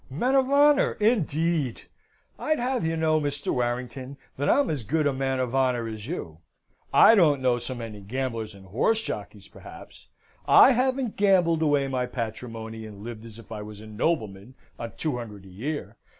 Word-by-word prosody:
"Men 240 Hz, -, 0 dB
of 265 Hz, -1 st, +3 dB
honour, 285 Hz, 0 st, +4 dB
indeed! 165 Hz, -, 0 dB, 0.6 s
I'd 310 Hz, 0 st, 0 dB
have 250 Hz, -1 st, -1 dB
you 160 Hz, 0 st, 0 dB
to -, -, -4 dB
know, 155 Hz, -1 st, +2 dB
Mr. 145 Hz, -1 st, -2 dB
Warrington, 125 Hz, +2 st, -3 dB, 0.2 s
that 145 Hz, +2 st, -1 dB
I'm 285 Hz, -, +3 dB
as 145 Hz, -6 st, -3 dB
good 155 Hz, +7 st, 0 dB
a 145 Hz, -, +2 dB
man 135 Hz, 0 st, -1 dB
of 125 Hz, -1 st, -2 dB
honour 125 Hz, -3 st, +1 dB
as 110 Hz, 0 st, -7 dB
you. 85 Hz, -, -6 dB, 0.5 s
I -, -, +7 dB
don't 160 Hz, -10 st, +4 dB
know 125 Hz, -2 st, +1 dB
so 125 Hz, +2 st, -5 dB
many 115 Hz, -3 st, -7 dB
gamblers 115 Hz, -1 st, -4 dB
and 95 Hz, -1 st, -14 dB
horse 215 Hz, -, +1 dB
jockeys, -, -, -6 dB
perhaps. -, -, -13 dB, 0.4 s
I -, -, +8 dB
haven't 255 Hz, -1 st, 0 dB
gambled 180 Hz, -5 st, +3 dB
away 145 Hz, -3 st, +2 dB
my 130 Hz, -2 st, -1 dB
patrimony, 115 Hz, -1 st, -6 dB
and 105 Hz, -1 st, -11 dB
lived 115 Hz, -1 st, -8 dB
as 110 Hz, -1 st, -12 dB
if 115 Hz, -1 st, -14 dB
I 105 Hz, -1 st, -5 dB
was 105 Hz, 0 st, -9 dB
a 110 Hz, -, -11 dB
nobleman 110 Hz, -, -2 dB, 0.2 s
on 115 Hz, -1 st, -6 dB
two 150 Hz, -6 st, -2 dB
hundred 105 Hz, -5 st, -8 dB
a -, -, -13 dB
year. 135 Hz, +11 st, -5 dB
130 Hz, 185 wpm, -26 LUFS, 115-165 Hz, 0.6 s, I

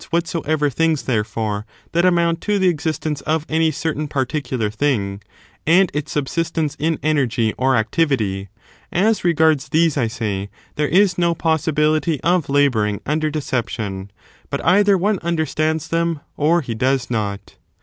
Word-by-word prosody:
251 170 Hz, +1 st, -1 dB, 0.2 s
soever 150 Hz, -1 st, +1 dB
things, 160 Hz, +2 st, +1 dB
therefore, 105 Hz, -3 st, -2 dB, 0.3 s
that 170 Hz, +1 st, +2 dB
amount 170 Hz, -2 st, +2 dB
to 210 Hz, -1 st, 0 dB
the 190 Hz, -1 st, +2 dB
existence 155 Hz, -2 st, -2 dB
of 155 Hz, 0 st, -1 dB
any 160 Hz, 0 st, +2 dB
certain 155 Hz, 0 st, -2 dB
particular 130 Hz, -5 st, -2 dB
thing, 105 Hz, -5 st, -1 dB, 0.5 s
and 180 Hz, +3 st, +5 dB
its 150 Hz, +1 st, -3 dB
subsistence 155 Hz, +1 st, -1 dB
in 160 Hz, +1 st, 0 dB
energy 125 Hz, -7 st, +1 dB
or 130 Hz, +1 st, +2 dB
activity, 110 Hz, -6 st, 0 dB, 0.4 s
as 210 Hz, +5 st, +2 dB
regards 160 Hz, -4 st, +2 dB
these, 160 Hz, -1 st, +2 dB
I 120 Hz, -5 st, +1 dB
say, 105 Hz, -4 st, -3 dB, 0.3 s
there 150 Hz, 0 st, 0 dB
is 185 Hz, +1 st, +3 dB
no 170 Hz, -1 st, +2 dB
possibility 155 Hz, -1 st, +1 dB
of 175 Hz, -3 st, +1 dB
labouring 125 Hz, -8 st, +2 dB
under 155 Hz, +1 st, 0 dB
deception, 115 Hz, -9 st, -3 dB, 0.4 s
but 140 Hz, -, -4 dB
either 200 Hz, +3 st, +5 dB
one 200 Hz, +2 st, +1 dB
understands 160 Hz, -1 st, -1 dB
them 165 Hz, -2 st, 0 dB
or 165 Hz, +4 st, +2 dB
he 125 Hz, -5 st, -4 dB
does 125 Hz, +2 st, 0 dB
not. 100 Hz, -3 st, -3 dB
150 Hz, 145 wpm, -20 LUFS, 125-165 Hz, 0.5 s, and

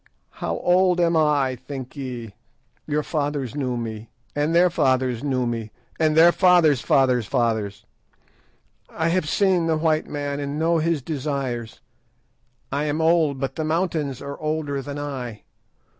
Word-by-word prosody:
How -, -, -3 dB
old 180 Hz, 0 st, +3 dB
am 170 Hz, -1 st, +3 dB
I, 145 Hz, -4 st, +2 dB
think 130 Hz, +1 st, -8 dB
ye? 125 Hz, -6 st, -6 dB, 0.5 s
Your 150 Hz, 0 st, 0 dB
fathers 145 Hz, -5 st, -2 dB
knew 130 Hz, -4 st, -2 dB
me, 110 Hz, -1 st, -6 dB, 0.3 s
and 150 Hz, +3 st, 0 dB
their 175 Hz, +1 st, +5 dB
fathers 130 Hz, -5 st, +1 dB
knew 130 Hz, -3 st, 0 dB
me, 115 Hz, -2 st, -3 dB, 0.3 s
and 155 Hz, -1 st, +2 dB
their 170 Hz, +2 st, +8 dB
fathers' 175 Hz, -8 st, +4 dB
fathers' 125 Hz, -5 st, +2 dB
fathers. 110 Hz, -4 st, -1 dB, 1.0 s
I 165 Hz, +1 st, -1 dB
have 170 Hz, -3 st, 0 dB
seen 185 Hz, -4 st, +2 dB
the 160 Hz, -1 st, +2 dB
white 155 Hz, 0 st, +1 dB
man 145 Hz, -1 st, -3 dB
and 140 Hz, +1 st, -3 dB
know 165 Hz, +1 st, +2 dB
his 160 Hz, -3 st, 0 dB
desires. 135 Hz, -6 st, -4 dB, 0.9 s
I 140 Hz, +2 st, -1 dB
am 150 Hz, +1 st, -1 dB
old, 160 Hz, -4 st, +2 dB
but 135 Hz, -1 st, -3 dB
the 160 Hz, -, -1 dB
mountains 155 Hz, -4 st, -1 dB
are 140 Hz, 0 st, -7 dB
older 155 Hz, -2 st, -2 dB
than 145 Hz, +1 st, -6 dB
I. 130 Hz, -7 st, -5 dB
145 Hz, 150 wpm, -23 LUFS, 130-160 Hz, 1.0 s, their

